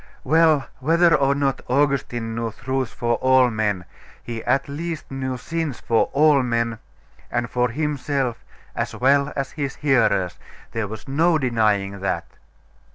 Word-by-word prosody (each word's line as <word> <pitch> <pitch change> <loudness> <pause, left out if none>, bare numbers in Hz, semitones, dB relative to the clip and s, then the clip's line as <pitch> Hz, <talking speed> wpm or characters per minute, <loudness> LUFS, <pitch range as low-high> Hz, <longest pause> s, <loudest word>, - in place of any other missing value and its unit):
Well, 155 -1 +4
whether 165 +5 +4
or 140 -1 +3
not 140 -2 0
Augustine 125 -4 0
knew 115 0 -3
truths 130 0 -3
for 120 0 -1
all 130 -1 +4
men, 105 -5 -1 0.4
he 115 -2 -6
at 135 0 +1
least 160 +2 -5
knew 130 -1 -3
sins 160 0 -3
for 115 - +1
all 150 -1 +4
men, 115 -2 -1 0.5
and 120 0 -1
for 125 +1 0
himself 140 -2 -2 0.3
as - - -3
well 140 +2 +3
as 135 -1 -3
his 140 -3 -4
hearers. 120 -10 +1 0.3
There 110 -2 -2
was 110 +5 -9
no 160 +5 +3
denying 105 -7 0
that. 85 -3 -2
130 Hz, 145 wpm, -22 LUFS, 115-145 Hz, 0.5 s, Well